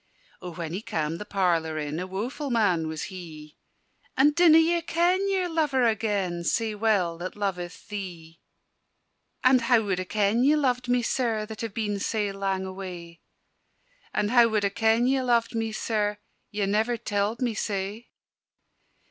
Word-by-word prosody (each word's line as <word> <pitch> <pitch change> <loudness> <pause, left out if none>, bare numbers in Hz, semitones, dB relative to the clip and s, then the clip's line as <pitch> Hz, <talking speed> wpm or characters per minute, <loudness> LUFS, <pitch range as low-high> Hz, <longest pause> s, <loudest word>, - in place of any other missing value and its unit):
O 180 - -6
when 165 -1 -6
he 190 - -3
cam' 165 -7 -3
the 210 - -6
parlour 170 -6 0
in, 150 +1 -3
A 180 - -4
woeful 240 +10 -4
man 195 -9 +2
was 155 -1 -4
he! 155 -4 -10 0.6
"And 290 +3 +5
dinna 335 -1 +6
ye 335 +1 +3
ken 360 +4 +1
your 380 -2 +1
lover 300 -7 +1
agen, 200 -6 0
Sae 225 +4 0
well 200 -6 +1
that 185 +1 -5
loveth 180 -4 -4
thee?" 175 -5 -7 1.0
"And 255 -1 +5
how 235 -1 +3
wad 195 -3 -1
I 185 - -3
ken 210 +4 +1
ye 290 +3 +5
loved 250 -4 0
me, 245 0 +2
Sir, 230 -4 0
That 220 0 -8
have 225 -3 -5
been 210 -3 -1
sae 205 0 -1
lang 195 -1 -2
away? 180 -3 -8 0.9
And 210 0 0
how 240 -2 +6
wad 215 -2 0
I - - +2
ken 225 +3 +2
ye 265 +1 +2
loved 240 -2 +1
me, 225 -1 -2
Sir? 210 -1 -1 0.3
Ye 205 -1 -1
never 220 +4 +1
telled 210 0 -1
me 245 -3 0
sae." 205 +2 -4
210 Hz, 165 wpm, -26 LUFS, 185-240 Hz, 1.0 s, dinna